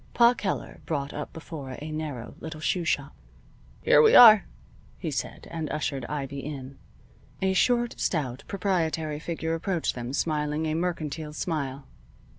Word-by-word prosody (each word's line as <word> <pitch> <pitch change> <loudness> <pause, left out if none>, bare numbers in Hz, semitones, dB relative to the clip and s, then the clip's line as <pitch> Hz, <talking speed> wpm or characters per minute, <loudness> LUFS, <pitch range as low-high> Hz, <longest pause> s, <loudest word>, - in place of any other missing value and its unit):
Pa 235 0 +6
Keller 210 -5 -4
brought 145 -3 -2
up 150 - -5
before 145 -5 -8
a 155 +1 -6
narrow 150 -6 -5
little 160 -1 -7
shoe 170 +2 0
shop. 145 -2 -1 0.7
"Here 150 - +6
we - - +6
are," 220 -4 +10 0.5
he - - -4
said, - - -4
and 160 -3 -3
ushered 145 -3 -2
Ivy 140 -1 -4
in. 135 -1 -7 0.6
A 190 0 +1
short, 240 +4 +2
stout, 135 -7 -1
proprietary 165 -6 -1
figure 160 0 -3
approached 170 0 -1
them 120 0 -5
smiling 150 0 0
a 155 - 0
mercantile 160 -3 -3
smile. 140 -5 -3
155 Hz, 145 wpm, -27 LUFS, 145-170 Hz, 0.7 s, are